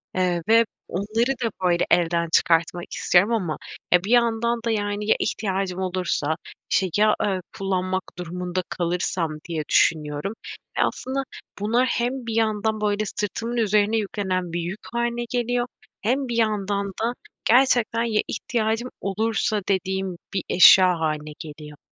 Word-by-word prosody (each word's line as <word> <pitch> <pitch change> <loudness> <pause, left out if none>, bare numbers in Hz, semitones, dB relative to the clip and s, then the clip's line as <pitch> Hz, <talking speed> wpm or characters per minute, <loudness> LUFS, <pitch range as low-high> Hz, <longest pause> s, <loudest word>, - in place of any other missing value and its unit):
Eee, 180 -2 +1
ve 230 +1 +6 0.2
onları 215 +7 0
da, 230 - 0
böyle, 175 -1 +3
evden 170 -1 +2
çıkartmak 170 +1 +2
istiyorum 185 +5 +3
ama 180 -9 -1 0.4
bir 180 +3 +3
yandan 235 -1 +3
da, 230 - +1
yani, 205 -1 -1
"Ya - - +6
ihtiyacım 190 -3 -2
olursa?", 180 -5 -1 0.4
işte, 190 - +3
"Ya, 215 0 +4
eee, 195 -2 0 0.2
kullanmak 185 -1 -1
durumunda 180 +1 -3
kalırsam?" 175 -1 -1 0.2
diye 160 -3 -2
düşünüyorum 150 +3 +2 0.4
ve - - +4
aslında 270 +1 -2 0.4
bunlar 230 +5 +2
hem 245 +1 -1
bir 225 - -2
yandan, 220 -1 0
böyle, 210 0 +1
sırtımın 230 +4 -3
üzerine 215 0 +2
yüklenen 190 -4 -2
bir 175 - -1
yük 180 +5 -5
hâline 235 0 -1
geliyor 245 0 0 0.3
hem 260 +5 0
bir 235 -1 -2
yandan 205 -3 0 0.2
da 235 +1 +1 0.3
gerçekten 240 -2 +4
"Ya 220 -2 +1
ihtiyacım 225 +1 -1
olursa?" 215 +1 0
dediğim 190 -1 -1 0.2
bir 195 - -1
eşya 180 -1 +7
hâline 155 -1 -2
geliyor. 150 -2 -9
205 Hz, 140 wpm, -24 LUFS, 180-230 Hz, 0.4 s, eşya